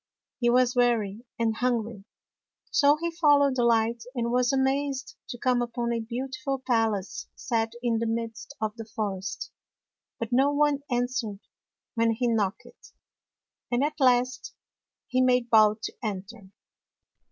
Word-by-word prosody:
He 240 -2 +2
was 250 +1 +3
weary 235 -3 +1
and 225 -1 0
hun 245 -2 +1
gry, 215 -3 -10 0.7
so 285 0 +5
he 340 +2 -2
followed 290 -5 +4
the 245 - +1
light, 230 0 +2
and 235 -1 -1
was 250 0 +2
amazed 270 0 0
to 245 - -5
come 250 0 +1
upon 235 0 -2
a 230 - -1
beautiful 260 +4 -3
palace 225 -6 -1
set 225 -2 -1
in 230 -2 +1
the 230 - -1
midst 230 +4 -4
of 215 0 -2
the 225 - -6
forest. 205 -3 -4 0.7
But 230 - -4
no 270 +3 +4
one 290 -1 +2
answered 245 -4 -2 0.5
when 230 -1 +2
he 245 +2 -1
knocked, 220 -3 -3 0.8
and 245 +3 +2
at 300 +1 -2
last 255 -1 +2 0.5
he 255 - +1
made 250 -2 +2
bold 215 0 +5
to - - -4
enter. 200 -1 -6
240 Hz, 145 wpm, -27 LUFS, 225-255 Hz, 0.8 s, so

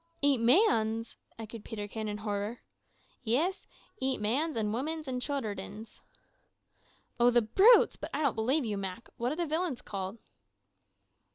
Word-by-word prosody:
"Eat 280 -3 +4
mans!" 230 - +3 0.2
echoed 225 -1 -8
Peterkin 215 0 -5
in 210 0 -3
horror. 210 +2 -4 0.6
"Yis, 295 - 0 0.3
eat 265 0 0
mans, 275 +10 0
and 215 -2 -1
womins, 305 +5 -3
an' 255 -1 -2
childerdens." 220 -5 -4 1.2
"Oh, 240 +1 +6
the 240 -1 +4
brutes! 390 - +6
But - - -6
I 295 +3 -1
don't 280 - +2
believe 255 +6 +1
you, 210 -2 -2
Mak. 195 +3 -6
What 240 +2 -1
are - - -2
the 345 +1 -1
villains 320 -4 -2
called?" 195 +1 -5
235 Hz, 145 wpm, -30 LUFS, 215-285 Hz, 1.2 s, Oh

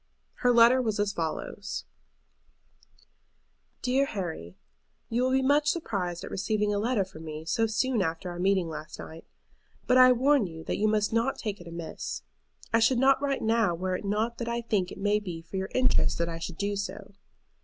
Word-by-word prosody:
Her 245 - +3
letter 240 +2 +6
was 220 -4 -1
as 205 0 +1
follows: 185 +4 -4 2.0
"DEAR 260 +2 +2
HARRY, 160 - -5 0.5
You 235 +2 0
will 255 - +2
be 265 0 +2
much 290 +2 +3
surprised 190 - -2
at - - -7
receiving 210 +1 0
a 205 - 0
letter 220 -2 +1
from 175 -4 -12
me 155 0 -7
so 225 +7 +1
soon 230 +1 +1
after 165 +1 -2
our 175 - -7
meeting 190 -1 +2
last 155 -1 -7
night. 160 +1 -10 0.6
But 255 - +4
I 255 0 +9
warn 265 -2 +3
you 160 -1 -9
that - - -2
you 215 - +3
must 215 0 +1
not 230 +4 +1
take 210 -4 -4
it 175 - -11
amiss. 170 -1 -6 0.5
I 230 - +5
should 230 +3 +4
not 270 +2 +4
write 280 -1 -1
now 220 -5 +2
were 185 +2 -2
it - - -5
not 215 +4 -1
that 235 - -3
I 235 0 -1
think 205 -6 -1
it - - -8
may 205 +1 +2
be 180 -5 -6
for 165 +4 -7
your 190 0 -3
interest 255 0 +2
that 170 - 0
I 165 0 -5
should 165 0 -6
do 200 0 -1
so. 200 0 -5
205 Hz, 195 wpm, -28 LUFS, 175-235 Hz, 2.0 s, I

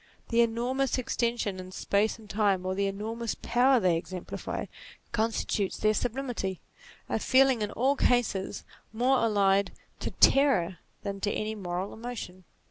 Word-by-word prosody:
The 235 0 +4
enormous 245 +4 0
extension 235 -5 -1
in 185 0 -8
space 205 +4 0
and 220 -2 -15
time, 200 -3 +1
or 185 - 0
the 200 +1 0
enormous 220 +4 -3
power 255 +2 +3
they 180 -5 +3
exemplify, 175 +2 -5 0.5
constitutes 220 -3 -1
their 215 0 +2
sublimity; 240 -6 -2 0.5
a - - -1
feeling 260 -3 +4
in 210 - -1
all 265 +6 +1
cases, 240 -8 +1 0.3
more 250 +4 +2
allied 200 -3 +2 0.3
to - - -3
terror 245 -11 +4 0.2
than 200 -1 -4
to 205 +1 0
any 215 +1 -2
moral 185 -2 -4
emotion. 220 -6 -7
215 Hz, 140 wpm, -29 LUFS, 195-245 Hz, 0.5 s, The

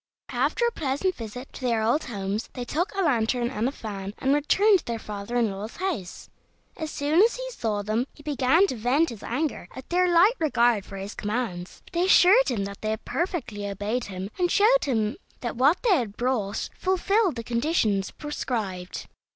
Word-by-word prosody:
After 475 - +1
a 470 - +2
pleasant 310 - -1
visit 245 0 -8
to - - -10
their 235 -3 +1
old 240 +8 +1
homes, 205 -2 -3
they 250 -2 -5
took 340 - -1
a 390 - +1
lantern 240 -4 +1
and 215 +3 0
a - - -1
fan, 200 -5 -6
and 270 +1 +1
returned 380 +8 +4
to - - -14
their 235 -1 -2
father 210 +1 -6
in 235 -4 +2
law's 200 +3 -7
house. 335 - -4 0.5
As 315 -3 -4
soon 305 +4 +2
as 460 +3 +4
he - - -5
saw 215 - -2
them 220 +5 -1
he 290 - -17
began 290 +5 +3
to 380 - -3
vent 255 +8 +2
his 225 - -9
anger 290 +6 -2
at 260 - -9
their 360 0 +3
light 355 +7 +6
regard 240 -9 +2
for 195 - -9
his 195 +2 -6
commands, 210 -5 -4
but - - -19
they 345 +1 +2
assured 385 +5 +6
him 225 -6 -1
that 200 0 -8
they 215 - -2
had 220 0 -3
perfectly 275 - -3
obeyed 210 +5 -2
him, 190 +1 -6
and 355 -1 +2
showed 460 +5 +4
him 220 -6 0 0.2
that 240 - -3
what 280 +9 +3
they 440 -6 +5
had 220 -6 -3
brought 230 -5 -1
fulfilled 380 - +1
the 230 - -5
conditions 235 - +1
prescribed. 215 -11 -4
245 Hz, 200 wpm, -26 LUFS, 215-330 Hz, 0.5 s, light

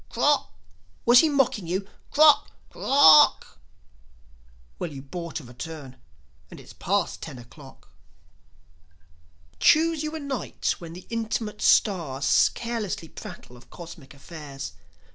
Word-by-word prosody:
"Krock!" - - +1 0.6
Was 240 +1 +7
he 320 - +4
mocking 270 - 0
you? 190 +3 -3 0.2
"Krock! 300 0 +5 0.2
Kor - - -14
r - - -5 0.4
rock!" - - -18 1.2
Well, 170 - -4
you 135 -2 -9
bought 170 +5 -6
a - - -13
return, 130 +2 -9 0.5
and - - -12
it's - - -14
past 195 -2 -2
ten 150 -5 -8
o'clock. 130 +3 -15 1.7
Choose 320 0 +3
you 310 +1 -4
a - - -4
night 280 -5 -3
when 165 -1 -10
the 180 +1 -11
intimate 220 -2 -3
stars 155 -9 +2
Carelessly 225 -8 -4
prattle 125 - -11
of 120 - -18
cosmic 160 -5 -12
affairs. 140 - -9
175 Hz, 125 wpm, -25 LUFS, 140-235 Hz, 1.7 s, Was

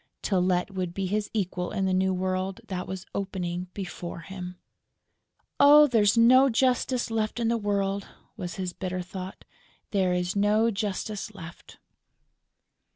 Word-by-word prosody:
Tylette 185 -1 +1
would 185 -2 -4
be 195 - -1
his 210 +2 -1
equal 185 -4 -2
in 195 - -1
the 190 - +1
new 190 +1 +2
world 185 +1 -2
that 180 -1 -4
was 190 -1 -6
opening 180 -2 -3
before 175 -3 -6
him! 180 +1 -8 1.0
"Oh, 295 +1 +9
there 240 -6 +2
is 205 +2 +3
no 255 +4 +7
justice 250 0 +1
left 220 +1 -1
on 230 -1 +1
earth!" 200 -3 0 0.3
was 180 -5 -5
his 185 -2 -4
bitter 185 -1 -4
thought. 185 +1 -8 0.5
"There 190 -3 +2
is 180 +1 -1
no 210 +3 +3
justice 210 0 -4
left!" 170 -2 -11
195 Hz, 145 wpm, -27 LUFS, 185-215 Hz, 1.0 s, Oh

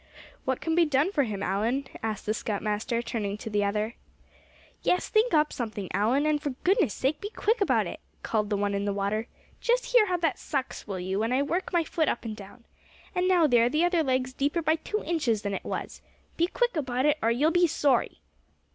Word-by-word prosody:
"What 260 -1 -1
can 325 - -1
be 340 +1 +5
done 300 +3 +2
for 285 -8 +2
him, 200 -3 -4
Allan?" 225 +8 0 0.2
asked 220 -2 -3
the 215 - +1
scoutmaster, 215 +2 -2
turning 210 -3 -3
to 220 - -7
the 205 0 +1
other. 210 +3 -1 0.9
"Yes, 360 - +1
think 440 +3 +3
up 300 0 +3
something, 215 -5 -4
Allan; 230 +9 +2
and 305 -1 +1
for 290 - -2
goodness 370 - +3
sake 280 +3 -1
be 410 - -4
quick 445 +1 0
about 400 - +3
it," - - -6 0.2
called 210 -2 0
the 205 - 0
one 205 0 0
in 200 0 -1
the 200 - 0
water. 205 +3 -1 0.3
"Just - - 0
hear 460 -4 +6
how 360 -1 +1
that 330 -3 0
sucks, 270 -6 -4
will 195 -2 -4
you, 190 +2 -2
when 225 +2 0
I 265 +2 +2
work 345 +6 -2
my 345 -2 +2
foot 320 0 0
up 235 - -3
and 220 -1 -4
down? 210 +4 -13 0.5
And 365 -1 +1
now, 360 -3 +5
there, 240 -4 +4
the 305 +6 +2
other 350 -2 +2
leg's 260 -2 0
deeper 290 +5 0
by 315 +1 +2
two 425 +6 -3
inches 260 -11 0
than 200 -1 -2
it - - -4
was. - - -5 0.3
Be 340 - +2
quick 485 +3 0
about 260 -3 -1
it, 300 0 +3
or 225 - +2
you'll 280 +8 +2
be 350 0 +4
sorry." 280 -5 +1
260 Hz, 220 wpm, -27 LUFS, 215-330 Hz, 0.9 s, hear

